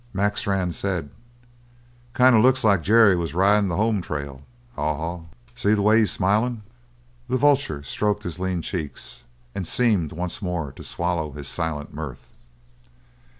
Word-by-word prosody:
Mac 100 +2 0
Strann 95 -3 -1
said: 85 -5 -3 1.0
"Kind 130 -1 +6
of 110 - +6
looks 130 +2 +3
like 100 -5 +4
Jerry 105 +1 +5
was 85 -1 -3
ridin' 100 +2 +4
the 85 - -2
home 105 0 +1
trail, 70 -4 -6 0.3
Haw 75 0 -1
Haw. 85 +3 -4 0.3
See 105 -3 +2
the 100 - 0
way 110 +2 +5
he's 110 - +3
smilin'?" 105 +4 0 0.6
The 130 +1 0
vulture 140 - +2
stroked 105 +6 -1
his 85 0 -5
lean 90 -2 -2
cheeks 80 -3 -6 0.3
and 90 - -4
seemed 105 -11 +1
once 90 +4 -4
more 85 -7 -3
to - - -12
swallow 85 -4 -2
his 70 -1 -6
silent 75 -3 -3
mirth. 75 -5 -8
95 Hz, 155 wpm, -23 LUFS, 80-105 Hz, 1.0 s, Kind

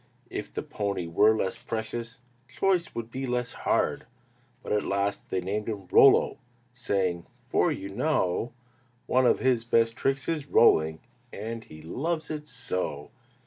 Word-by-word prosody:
If - - -5
the - - -4
pony 100 -4 -3
were 105 +7 +4
less 95 -3 -2
precious, 115 +2 -5 0.3
Choice 175 +7 0
would 115 0 -5
be 130 +2 -4
less 125 0 -1
hard! - - 0 0.6
But - - -6
at 105 -1 +2
last 100 0 -1
they 95 - -1
named 105 +4 -2
him 100 -3 -5
"Rollo," 135 - +6 0.3
Saying, 95 -8 -1 0.2
"For - - +3
you 95 - -4
know 105 - 0 0.5
One 130 0 +3
of - - +4
his 125 -3 +2
best 115 -1 +2
tricks 135 0 0
is 155 -4 -2
rolling, 80 - +4 0.3
And 110 +2 -5
he 80 0 -12
loves 155 - -3
it 150 -1 -5
so." 90 - -4
115 Hz, 150 wpm, -27 LUFS, 95-130 Hz, 0.6 s, Rollo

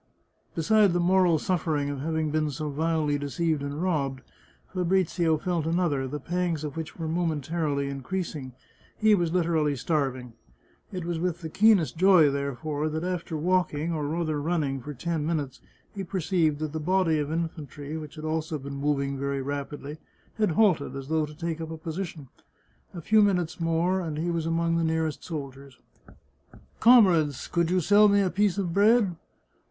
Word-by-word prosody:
Besides 200 +3 +4
the 175 - +1
moral 180 -1 +4
suffering 155 -4 -1
of 140 - -5
having 160 +1 -1
been 155 0 0
so 150 +1 -4
vilely 155 -1 0
deceived 155 +2 -1
and 145 +4 -4
robbed, 140 -7 -1 0.5
Fabrizio 180 -3 +1
felt 170 -1 -2
another, 165 -6 0
the 150 +3 -5
pangs 170 0 -2
of 150 -2 -5
which 160 -1 -6
were 165 -2 -4
momentarily 155 -3 -1
increasing 140 -1 -4 0.2
— - - -32
he 215 0 +4
was 175 -5 +2
literally 165 -4 +1
starv 135 -1 -1
ing. 125 -2 -11 0.6
It 180 -3 -5
was 170 -1 -2
with 175 0 -2
the 160 - -5
keenest 195 -4 +3
joy, 180 -5 +6
therefore, 145 +2 -2
that 160 +2 -3
after 175 -3 -3
walk 180 0 +1
ing, 160 +4 -2
or 150 -2 -2
rather 155 -1 -1
running, 145 -4 -1
for 145 +3 -7
ten 165 +3 -2
minutes, 150 -4 -3 0.3
he 195 - -4
perceived 175 -4 0
that 155 -1 -2
the 160 - -2
body 170 -1 +2
of 150 0 -2
infantry, 155 -3 -4
which 155 -1 -7
had 155 0 -7
also 160 0 -2
been 140 0 -7
moving 140 -1 -1
very 140 0 -2
rapidly, 145 +2 -5 0.4
had 215 - +3
halted, 180 -8 +2
as 135 0 -7
though 160 -1 +1
to 150 - -11
take 165 -1 -3
up 160 - -5
a 160 - -6
position. 160 -2 -6 0.7
A 170 - -5
few 215 +6 +4
minutes 180 -5 +1
more 165 +3 +1
and 160 -4 -4
he 170 +3 -1
was 165 -1 -2
among 165 0 +1
the 165 - +1
nearest 160 -1 -1
soldiers. 140 -4 -7 0.5
" - - -25
Comrades, 180 - +5
could 170 -1 0
you 185 +1 +2
sell 205 +5 +5
me 200 0 +4
a 185 -2 +1
piece 200 0 +1
of 180 -4 -1
bread 205 -1 +4
160 Hz, 180 wpm, -27 LUFS, 145-175 Hz, 0.7 s, joy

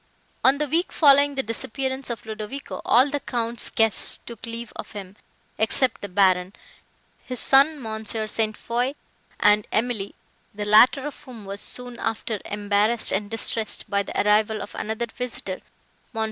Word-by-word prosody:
On 270 +2 +5
the 300 +1 -1
week 335 +6 0
following 285 -1 +5
the 270 - 0
disappearance 260 +4 -4
of 235 -2 -5
Ludovico, 220 +6 -6
all 260 +4 +4
the 290 - -1
Count's 235 -3 -1
guests 225 -2 +4
took 230 -1 -9
leave 230 0 -7
of - - -8
him, 195 -2 -8 0.4
except 225 +3 +1
the 205 - -6
Baron, 185 -1 +2 0.7
his 250 -2 -4
son 280 +3 +4
Mons. 220 -2 -5
St. 215 0 -1
Foix, 245 +4 -2 0.4
and 210 0 +4
Emily; 220 -3 -1 0.4
the 210 0 -4
latter 230 +6 +5
of 295 - -8
whom 235 -5 -11
was 200 +1 -5
soon 245 -1 -3
after 225 -1 -3
embarrassed 205 +2 +1
and 205 +1 -1
distressed 225 -1 -1
by 200 0 +2
the 200 - -4
arrival 215 0 +2
of - - -11
another 220 +2 -3
visitor, 230 -5 -6 0.5
Mons. 225 - -4
225 Hz, 160 wpm, -24 LUFS, 210-255 Hz, 0.7 s, On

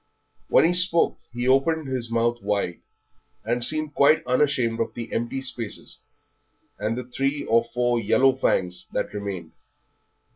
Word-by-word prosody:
When - - +5
he 170 - +3
spoke 180 -1 +3
he 120 +1 -3
opened 140 +4 +2
his 125 -3 -3
mouth 120 +1 0
wide, 100 -4 -1 0.7
and 120 +2 0
seemed 155 +3 0
quite 145 +3 +4
unashamed 125 -3 +1
of 115 - -2
the 115 -1 -6
empty 120 +3 -2
spaces 120 -5 -4 0.8
and 110 +3 -2
the 125 - -4
three 135 +4 -2
or 115 +1 +3
four 120 0 0
yellow 130 +5 +3
fangs 90 -8 -1
that - - -2
remained. 100 -5 -5
120 Hz, 145 wpm, -24 LUFS, 115-135 Hz, 0.8 s, When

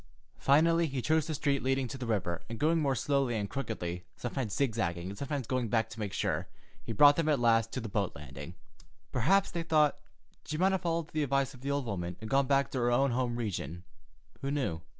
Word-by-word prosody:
Finally, 165 +4 +4
he 135 -2 -3
chose 155 +4 +1
the 160 - -2
street 140 -1 +1
leading 135 0 0
to 120 - -6
the 130 -2 -5
river, 95 -6 -1
and 115 - -5
going 160 +5 +2
more 140 -3 +1
slowly 135 -1 +1
and 100 -2 -2
crookedly, 90 -10 -4
sometimes 120 -4 -3
zigzagging 95 -9 -1
and 100 - -6
sometimes 140 -2 -3
going 125 0 -1
back 115 0 0
to 115 - -9
make 105 -2 -3
sure, - - -1 0.4
he - - -5
brought 145 +6 +7
them 165 -2 +1
at 145 -4 +3
last 115 -1 +3
to - - -3
the 115 - -5
boat 100 -2 -1
landing. 70 +4 -9 0.6
Perhaps, 190 +11 +3
they 170 - -2
thought, 155 -3 +3 0.4
she 155 - -4
might 190 +3 +3
have 190 - 0
followed 165 -2 -1
the 155 - -1
advice 140 -1 +1
of 130 - -14
the 140 - -4
old 140 -2 0
woman 90 -5 -4
and 110 -1 -8
gone 135 0 +3
back 140 0 +2
to 130 - -2
her 120 0 +2
own 135 +2 +3
home 120 -1 0
region—who 90 - -6
knew? 130 - -1
130 Hz, 220 wpm, -31 LUFS, 110-145 Hz, 0.6 s, brought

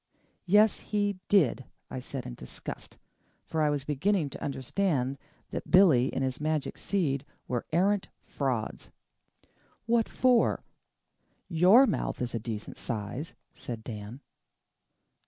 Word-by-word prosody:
"Yes, 210 +3 +5
he 205 -2 -1
did," 150 - +3 0.3
I - - -4
said 130 0 -6
in - - -6
disgust 60 - -8 0.5
for 160 - -1
I 150 - +3
was 145 -2 -1
beginning 150 +2 +1
to - - -8
understand 140 -1 -1 0.3
that - - -5
Billy 160 -10 +6
and 135 - -1
his 130 +2 -2
magic 155 -1 -1
seed 145 -9 0 0.2
were 120 -2 -2
arrant 190 +4 +2 0.2
frauds. 125 -6 -3 1.0
"What 230 -1 +2
for? 250 -2 +3 0.9
YOUR 185 +10 +7
mouth 215 - -2
is 125 -1 -2
a 115 - -1
decent 110 -1 -6
size," 120 +6 -4 0.2
said 115 -2 -7
Dan. 110 +3 -7
145 Hz, 125 wpm, -29 LUFS, 125-195 Hz, 1.0 s, YOUR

